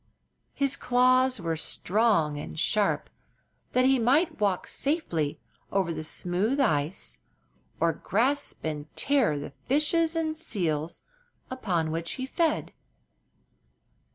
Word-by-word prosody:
His 275 -1 0
claws 255 0 +3
were 165 -2 -2
strong 165 -3 +1
and 155 - -7
sharp, 205 +4 +1 0.7
that 255 0 +4
he 265 0 +4
might 275 +9 +2
walk 200 -3 +1
safely 175 - -1 0.3
over 190 -4 +1
the 155 - -5
smooth 185 - -1
ice 150 - 0 0.6
or 165 0 +2
grasp 250 - -1
and 150 -1 -3
tear 265 - +2
the 145 0 -7
fishes 315 +4 +2
and 315 -1 -1
seals 170 - -2 0.5
upon 180 -11 -1
which 165 +1 -2
he 260 - -4
fed. 320 +3 0
210 Hz, 115 wpm, -27 LUFS, 165-270 Hz, 0.7 s, that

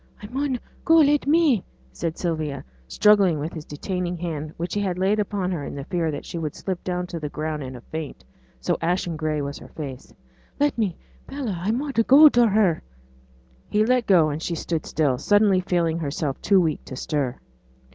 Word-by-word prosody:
'I - - -6
mun 265 0 -1 0.2
go 325 - +5
let 295 -3 +4
me,' 295 - +4 0.3
said 165 -1 -4
Sylvia, 155 -5 -2 0.2
struggling 195 - +4
with 150 +3 -4
his 155 -2 -7
detaining 180 +3 -3
hand, 155 -3 -4
which 170 +2 -4
he 205 - 0
had 185 -3 -1
laid 195 +3 +2
upon 200 -3 -1
her 165 -5 -3
in - - -6
the 140 - -5
fear 170 +1 -1
that 145 - -5
she 170 - -5
would 155 -2 -4
slip 185 -3 -4
down 180 -1 -2
to 175 -2 -6
the 150 -2 -4
ground 155 0 -3
in 130 -1 -6
a 120 - -10
faint, 155 - -7 0.4
so - - 0
ashen 175 0 0
gray 155 -1 -1
was 140 0 -5
her - - -12
face. 135 -4 -8 0.5
'Let 290 0 +2
me, 205 -7 -1 0.3
Bella, 270 -8 -3
I 190 - -1
mun 270 +5 -1
go 295 +4 +9
see 240 -1 +5
her.' 200 -6 +2 0.9
He 210 +1 +2
let 250 0 +2
go, 165 -6 +5
and 150 +2 -4
she 170 - -2
stood 165 0 -3
still, 140 -5 +1
suddenly 205 +2 +4
feeling 170 -3 0
herself 145 -2 -3
too 200 -2 +4
weak 160 -4 0
to 130 - -7
stir. 135 -2 -2
175 Hz, 200 wpm, -24 LUFS, 155-210 Hz, 0.9 s, go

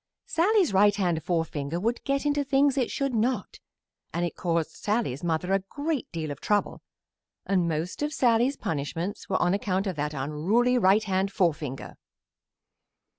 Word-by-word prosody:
Sallie's 365 - +2
right 205 +1 +5
hand 175 -5 0
forefinger 160 -2 -2
would 230 +5 -1
get 275 +1 0
into 290 0 +1
things 275 0 +3
it 260 -3 0
should 275 -2 -2
not, 230 -2 -1 0.5
and 170 +2 -1
it 170 - -4
caused 170 -2 -1
Sallie's 210 - -2
mother 175 +2 0
a 195 - +4
great 285 +9 -4
deal 160 -3 -4
of 140 - -8
trouble, 205 -1 0 0.6
and 185 -3 +1
most 165 - -3
of 295 0 0
Sallie's 245 -1 +2
punishments 165 +6 -4
were 190 - +1
on 175 +1 +2
account 195 -1 0
of 185 -5 -3
that 150 +1 -2
unruly 185 - +1
right 200 +1 +4
hand 190 0 0
forefinger. 150 -8 -2
195 Hz, 160 wpm, -27 LUFS, 165-245 Hz, 0.6 s, right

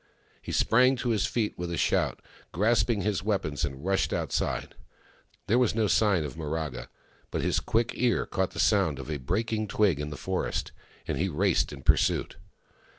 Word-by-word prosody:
He - - -7
sprang 130 +3 +4
to 125 -1 -3
his 110 -3 +1
feet 110 -3 -1
with 90 -1 -3
a 85 - -2
shout, - - 0 0.3
grasping 110 +3 +2
his 100 -1 0
weapons, 95 -9 -1
and 70 +2 -4
rushed 95 0 +1
outside. - - -2 0.7
There 120 +4 +3
was 125 -4 +2
no 110 -1 +2
sign 100 -4 +3
of 70 -4 -6
Miraga 75 -5 -4 0.2
— - - -33
but - - -2
his - - +1
quick 115 +2 0
ear 120 -2 +1
caught 95 -2 -1
the - - -9
sound 95 -9 +3
of 70 +3 -7
a 75 - -1
breaking 110 - -1
twig 100 -6 +2
in 75 0 -3
the 75 - -7
forest, - - -2 0.4
and - - -2
he 95 +3 +1
raced 95 +3 +1
in 70 -2 -9
pursuit. - - +2
95 Hz, 185 wpm, -28 LUFS, 75-110 Hz, 0.7 s, sprang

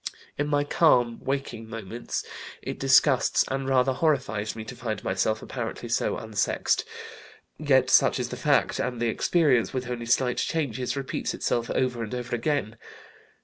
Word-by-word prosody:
In 145 - -1
my 145 -1 +2
calm, 125 -6 +3
waking 135 -5 -3
moments 115 +1 -5 0.4
it - - -5
disgusts 135 -1 +4
and 135 0 -2
rather 130 0 +3
horrifies 130 -9 0
me 110 - -6
to 125 - -8
find 115 -2 -4
myself 100 +3 0
apparently - - -5
so - - 0
unsexed 110 -3 0 0.8
yet 130 -4 +3
such - - +5
is 125 -1 -2
the 125 - -5
fact, 145 +3 +1
and 125 -2 -2
the 120 -1 +1
experience, 140 -1 +2
with 130 -1 -2
only 120 -1 -4
slight 125 +1 +2
changes, 135 -5 -2
repeats 135 +1 -3
itself 120 -1 -1
over 125 -2 0
and 115 +2 -4
over 125 -1 -3
again. 120 -3 -1
125 Hz, 155 wpm, -26 LUFS, 115-135 Hz, 0.8 s, such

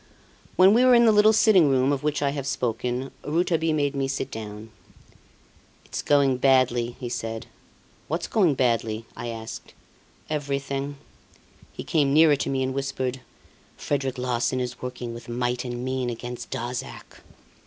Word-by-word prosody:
When 190 +2 +6
we 240 +3 +4
were 255 -1 +6
in 235 0 +6
the 225 - +6
little 210 +1 +6
sitting 210 -8 +5
room 130 0 +2
of 135 - -2
which 150 -1 -1
I 140 - +1
have 140 -1 -4
spoken, 125 +1 -2
Rouletabille 165 0 +1
made 145 -1 0
me 135 -1 0
sit 135 0 -3
down. 110 0 -8 1.1
"It's - - -5
going 140 -3 +3
badly," 125 -2 +2
he 125 - -5
said. 115 -2 -4 0.6
"What's 165 +3 -2
going 185 -10 +2
badly?" 115 -3 0
I 120 - -6
asked. 115 -1 -8 0.5
"Everything." 140 -1 -3 0.7
He - - -8
came 145 -3 +1
nearer 155 -1 +6
to - - -2
me 135 -1 0
and 130 0 -2
whispered: 130 -1 -3 0.6
"Frederic 135 -2 -2
Larsan 125 0 -1
is 125 0 -4
working 125 -2 -5
with 120 0 -10
might 120 +1 -1
and 120 0 -5
main 130 -1 -1
against 120 +1 -6
Darzac." 125 -1 -6
130 Hz, 155 wpm, -25 LUFS, 120-145 Hz, 1.1 s, When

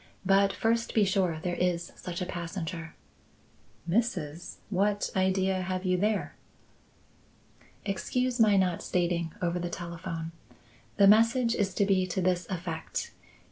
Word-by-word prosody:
But 195 +1 +4
first 230 +4 0
be 215 -2 +5
sure 185 -4 +1
there 180 -1 -1
is 175 -1 -1
such 180 0 -5
a - - -3
passenger." 170 -2 -5 0.9
"Mrs.! 175 -6 -1 0.2
What 205 +2 +1
idea 190 0 +2
have 185 +1 -3
you 185 0 +2
there?" 210 +3 0 1.5
"Excuse 245 +5 -1
my 210 -3 +5
not 185 -3 +1
stating 170 -2 0
over 175 0 0
the 175 0 -3
telephone. 170 -1 -5 0.7
The 200 - +6
message 230 +3 +5
is 195 -5 -1
to 200 - +3
be 190 -2 +2
to 185 - -2
this 180 -2 +1
effect. 170 -3 -4
185 Hz, 135 wpm, -29 LUFS, 175-200 Hz, 1.5 s, The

